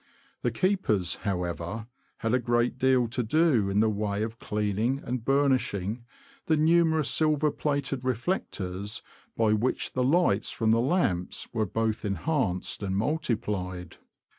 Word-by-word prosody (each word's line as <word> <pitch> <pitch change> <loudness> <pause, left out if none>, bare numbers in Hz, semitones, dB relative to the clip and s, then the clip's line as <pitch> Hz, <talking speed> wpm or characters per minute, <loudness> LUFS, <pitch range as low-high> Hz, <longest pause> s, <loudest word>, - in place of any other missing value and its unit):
The 120 - +1
keepers, 115 - 0
however, 90 +2 -3 0.3
had 115 +1 -1
a 125 - +4
great 120 +1 0
deal 130 -2 +3
to 125 +2 -1
do 125 -4 +2
in 100 +2 +2
the 110 - +3
way 105 0 -1
of 110 +1 -5
cleaning 105 +5 -1
and 125 -1 -3
burnishing 125 -6 +1 0.4
the 160 -2 +3
numerous 160 -1 +3
silver 155 -1 +3
plated 140 -3 -2
reflectors 105 - -2 0.3
by 110 -2 +3
which 115 +4 0
the 130 - +1
lights 135 - +2
from 110 -1 +1
the 115 +1 +4
lamps 120 - 0
were 110 -3 0
both 110 +2 -1
enhanced 100 - -1
and 95 -1 -1
multiplied. 105 - -2
115 Hz, 140 wpm, -27 LUFS, 105-140 Hz, 0.4 s, a